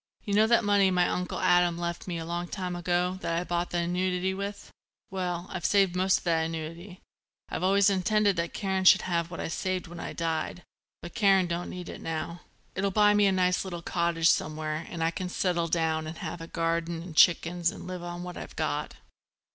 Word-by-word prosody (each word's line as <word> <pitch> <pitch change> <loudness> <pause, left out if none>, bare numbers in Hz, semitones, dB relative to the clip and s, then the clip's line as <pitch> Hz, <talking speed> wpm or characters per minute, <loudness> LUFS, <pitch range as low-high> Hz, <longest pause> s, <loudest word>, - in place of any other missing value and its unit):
You 205 - -3
know 215 +2 +5
that 235 0 +4
money 200 -2 +4
my 180 -1 +3
Uncle 180 0 -2
Adam 175 -1 +3
left 170 +1 -4
me 175 -2 -3
a 165 - -5
long 175 +1 -3
time 180 -1 -4
ago 180 +1 0
that 165 - -1
I 170 - 0
bought 175 0 -2
the 175 - -2
annuity 180 +2 0
with. 200 +1 -6 0.4
Well, 180 -2 -3
I've 180 - -5
saved 195 -2 +3
most 185 +1 +3
of - - -10
that 165 -2 +2
annuity; 165 +3 -7 0.5
I'd - - -4
always 195 +2 +4
intended 200 +1 +2
that 170 0 -2
Karen 190 -1 -1
should 190 +1 +7
have 170 -2 -1
what 170 - -7
I'd - - -3
saved 185 0 -2
when 175 0 -10
I - - -5
died. 165 +1 -2 0.4
But 175 - -8
Karen 195 -4 +4
don't 175 0 -3
need 180 -1 -7
it - - -8
now. 165 +2 -4 0.3
It'll 195 +1 0
buy 210 +1 +4
me 205 -1 +4
a - - +3
nice 180 -1 +2
little 175 -3 -6
cottage 170 -1 +1
somewhere 155 -1 -2
and 165 -2 -3
I 165 - +2
can 180 +1 -4
settle 175 -2 0
down 160 -1 0
and 160 +1 -7
have 175 - -6
a 165 - -7
garden 165 0 -1
and 170 -3 -10
chickens 170 0 +4
and 205 - -8
live 185 -1 -6
on 175 0 -6
what 180 -1 -7
I've - - -8
got." - - -2
175 Hz, 215 wpm, -28 LUFS, 170-190 Hz, 0.5 s, should